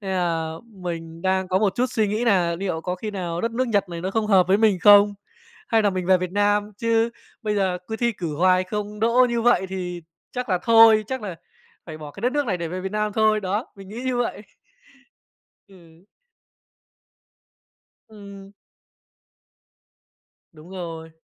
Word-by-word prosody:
nên 195 -2 -5
là 165 -3 -1
mình 170 -5 -7
đang 190 0 0
có 185 - +2
một 195 -2 +1
chút 250 - +2
suy 215 -2 0
nghĩ 215 +4 -1
nà 180 -7 +2
niệu 180 -3 -3
có 180 +2 -3
khi 210 +4 -6
nào 175 -4 -4
đất 230 - -1
nước 255 +2 -1
Nhật 200 -4 +1
này 170 -1 -6
nó 185 +2 -3
không 220 +1 -1
hợp 190 -4 +4
với 190 - +5
mình 215 -4 +3
không, 205 +1 +7 0.5
hay 225 -1 +3
là 205 - +3
mình 185 -2 -3
về 185 0 +5
Việt 180 0 -4
Nam 205 +1 +1
chứ 230 0 +2 0.3
bây 210 -2 -1
giờ 190 -3 0
cứ 220 - -3
thi 235 +1 0
cử 170 -7 -5
hoài 185 +2 +3
không 210 +2 -5
đỗ 235 +3 +4
như 235 -1 -1
vậy 240 -5 +3
thì 180 -2 -5 0.3
chắc 250 -1 -4
là 185 -2 +1
thôi, 225 -2 +6
chắc 260 +1 -4
là 190 -5 -6 0.5
phải 155 -2 -8
bỏ 150 -1 -9
cái 170 - -12
đất 245 +3 0
nước 290 -1 0
này 195 -5 0
để 170 -1 -4
về 180 +3 -5
Việt 190 +1 -5
Nam 210 0 -1
thôi, 215 0 +2
đó, 205 +4 -2
mình 195 -1 -12
nghĩ 220 +4 -7
như 260 -1 -1
vậy. 240 -3 -2 1.3
Ừ. 195 - -18 2.3
Ừm. 200 -2 -12 2.0
Đúng 155 +2 -15
rồi, 165 -3 -7
200 Hz, 190 wpm, -23 LUFS, 180-220 Hz, 2.3 s, không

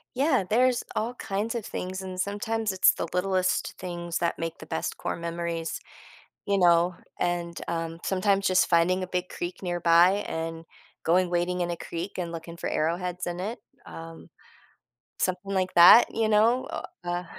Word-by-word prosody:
Yeah, 265 -4 +2
there's 245 +2 +3
all 230 +3 -1
kinds 210 -1 -3
of 225 - -3
things, 185 +1 -5
and 185 -1 -7
sometimes, 210 +2 -1
it's 190 -1 +5
the - - -4
littlest 185 0 0
things 175 -1 -4
that 170 - -1
make 165 0 -4
the - - -11
best 160 - -3
core - - -3
memories, 170 0 -4 0.7
you 200 -1 +2
know? 175 0 +4 0.2
And, 175 -1 -2
um 165 -1 -3
sometimes 195 +1 +1
just 185 0 +3
finding 180 +2 +3
a - - -2
big 180 0 -3
creek 175 +2 -6
nearby, 175 +2 +3
and 165 0 -4 0.4
going 180 +2 +3
wading 175 +1 0
in 175 0 -1
a 170 - -2
creek, 170 +4 -6
and 170 -2 -3
looking 165 0 -8
for - - -4
arrowheads 180 +3 -1
in 175 +1 -4
it, 225 +5 -4 0.3
um, 165 0 -10 0.9
something 185 +2 -2
like 185 -1 0
that, 175 +7 +9
you 225 -1 +1
know, 225 +4 +3
o - - -4 0.2
uh 175 +1 -2
180 Hz, 170 wpm, -27 LUFS, 170-195 Hz, 0.9 s, that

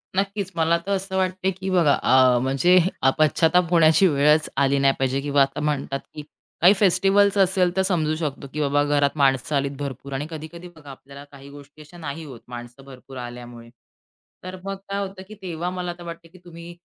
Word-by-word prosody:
नक्कीच, 195 0 -2
मला 165 +1 +2
तर 200 - -3
असं 190 0 -5
वाटतंय 185 0 -1
की 190 +1 -6
बघा 170 -6 +3
अ, 130 -1 +4
म्हणजे 135 +8 +3 0.2
अ, 135 - +4
पश्चात्ताप 165 +3 +3
होण्याची 165 +1 +5
वेळच 150 +1 +2
आली 140 0 +2
नाही 135 0 +3
पाहिजे 135 +1 0
किंवा 145 -1 +1
आता 135 +2 0
म्हणतात 140 -2 -2
की 150 - -8 0.4
काही 180 +4 +7
फेस्टिव्हल्स 200 +1 +3
असेल 185 -2 +2
तर 190 - +2
समजू 165 -5 0
शकतो 150 -3 -5
की 150 - -4
बाबा 145 0 +1
घरात 145 0 +1
माणसं 135 0 +1
आलीत 140 0 0
भरपूर 140 0 -6
आणि 140 +3 -3
कधी-कधी 165 +2 -9
बघा 150 -3 -14
आपल्याला 140 +1 -13
काही 140 0 -13
गोष्टी 145 +1 -14
अशा 165 +4 -15
नाही 160 0 -6
होत 130 -5 -11
माणसं 120 +2 -10
भरपूर 135 0 -13
आल्यामुळे. 120 -1 -9 0.7
तर 185 0 -7
मग 195 0 -4
काय 200 0 -2
होतं 190 0 -12
की 215 - -11
तेव्हा 175 -1 -4
मला 180 -1 -4
तर 175 - -11
वाटतं 170 -1 -10
की - - -15
तुम्ही 170 0 -11
155 Hz, 195 wpm, -23 LUFS, 140-180 Hz, 0.7 s, काही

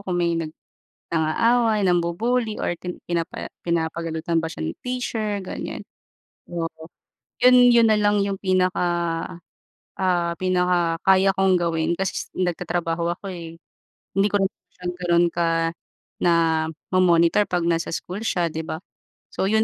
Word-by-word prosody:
kung 175 - 0
may 170 -1 +1
nag 160 -2 -4 0.6
nang-aaway 220 +7 +2
nambu-buly 210 +7 0
or - - 0
pin 180 +1 -7
pinapa 170 -1 -3 0.2
pinapagalitan 165 0 -1
ba 165 - +1
siya - - -8
ni 80 - -3
teacher 225 -5 -2
ganiyan. - - -6 0.7
Oo. 165 -1 -2 0.7
'Yon, 250 0 +7 0.2
'yon 235 -1 +6
nalang 210 -1 +3
yung 200 -1 -1
pinaka 185 0 +1 1.2
ah, 175 -2 +1
pinaka-kaya 180 +1 +2
kong 190 -1 +4
gawin 165 -1 0
kasi 195 +1 -3
nagtatrabaho 175 -1 -1
ako, 195 -1 -7
eh. 165 -2 -8 0.6
Hindi 195 +1 +4
ko - - 0
rin 195 - +2 0.3
siya 180 - -13
gano'n 175 -1 +2
ka, 165 -1 +1 0.5
namo-monitor 170 +2 +2
'pag 175 -1 0
nasa 170 -1 0
school 185 +3 -5
siya 175 -5 +1
'di 160 +1 -4
ba. 160 - -4 0.5
So, - - -1
'yon 220 0 +3
175 Hz, 130 wpm, -23 LUFS, 165-195 Hz, 1.2 s, Yon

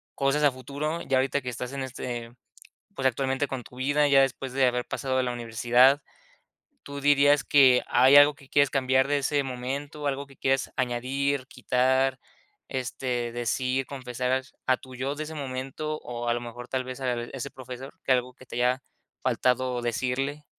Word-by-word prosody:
cosas 140 +2 +1
a 145 - +5
futuro. 140 +6 -4
Ya 135 - +1
ahorita, 135 +2 +1
que 125 - -4
estás 125 +1 -5
en 135 -1 -3
este, 120 -2 -5 0.6
pues, 135 - -4
actualmente 135 +2 0
con 130 -2 -5
tu 125 - -15
vida. 145 +3 +2
Ya 140 -1 +6
después, 135 -1 -1
de 135 0 +3
haber 125 0 0
pasado 130 -2 -2
de 130 - +2
la 125 - -1
universidad. 120 +4 +3 0.8
Tú 140 0 -7
dirías 145 0 +4
que, 130 -3 +6
¿hay 130 +3 +6
algo 145 +1 +8
que 140 -1 -18
quieres 140 -1 +3
cambiar 130 -1 +2
de 145 0 +2
ese 140 +1 +1
momento? 135 +4 -5
¿Algo 140 0 -3
que 135 -1 -18
quieres 135 0 0
añadir, 130 +2 -1
quitar, 130 0 +1 0.5
este, 125 -2 -3
decir, 125 +2 -1
confesar, 130 -1 -2 0.2
a 130 - +4
tu 130 0 -13
yo 135 +3 -2
de 150 - -5
ese 160 +1 -8
momento? 135 +2 -4
O 120 0 -5
a 120 - +3
lo 120 - -2
mejor, 120 +1 -8
tal 130 -1 -1
vez, 130 +1 -7
a 125 -2 0
ese 135 +2 -6
Profesor, 130 +1 -9
que - - -4
¿Algo 125 0 0
que 130 - -16
te 120 - -8
haya 125 +2 +1 0.4
faltado 125 0 +1
decirle? 130 +5 -2
130 Hz, 185 wpm, -27 LUFS, 125-140 Hz, 0.8 s, algo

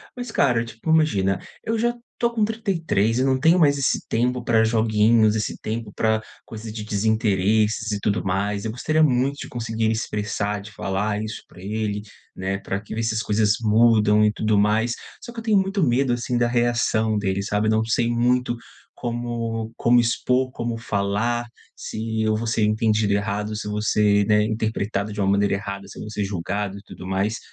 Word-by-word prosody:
Mas 245 -2 -6
cara, 120 -4 +2
tipo 115 +6 -8
imagina, 100 -13 +2 0.2
eu 225 +1 -1
já 240 +2 +1 0.2
tô 235 - +2
com 220 -3 +1
33 165 - 0
eu 130 - +2
não 130 -1 +2
tenho 165 +5 +5
mais 145 -3 +4
esse 135 - 0
tempo 125 +1 0
pra 115 -2 +3
joguinhos, 110 0 +3
esse 110 - -2
tempo 110 -1 -4
pra 110 0 +1 0.2
coisas 110 0 -8
de 110 0 -6
desinteresses 110 0 +1
e 105 - -1
tudo 100 +1 0
mais, 100 +2 -1
eu 110 - -2
gostaria 155 +7 0
muito 135 0 +2
de - - -6
conseguir 115 -2 -2
me 110 - +2
expressar, 105 -2 -2
de 105 - -11
falar 105 +1 -2
isso 110 0 -6
pra - - -16
ele, 105 0 -2 0.3
né, 95 +1 -2
para 100 0 -3
que 105 - -9
ver 115 - -2
se 110 -1 0
as 110 - 0
coisas 105 0 +2
mudam 105 -1 +4
e 105 - +4
tudo 110 0 0
mais. 110 +3 +2 0.3
Só 240 - -8
que 235 - -6
eu 225 - -7
tenho 220 -3 +3
muito 195 0 0
medo 125 -1 +2
assim 120 0 -1
da 120 0 +2
reação 120 -2 +1
dele, 100 -1 -1
sabe, 105 +1 0
eu - - +3
não 110 0 +2
sei 115 +1 +1
muito 120 +1 +1 0.4
como 115 -2 -3
como 120 +1 +4
expor, 125 +2 +1
como 120 -2 -3
falar, 115 +2 -1 0.3
se 110 0 -4
eu 110 0 +2
vou 115 - -3
ser 115 -1 +1
entendido 105 -1 +2
errado, 105 +1 -1
se 105 - -5
eu - - -3
vou 105 0 -2
ser, 105 -1 +3
né, 105 0 +4
interpretado 110 -1 -2
de 105 - -6
uma 95 - +2
maneira 100 0 +2
errada, 100 -1 -6
se - - -12
eu - - -7
vou 110 - -7
ser 105 - -2
julgado 100 +1 -3
e - - -11
tudo 90 - -10
mais. 95 +3 -1
110 Hz, 205 wpm, -23 LUFS, 105-120 Hz, 0.4 s, tenho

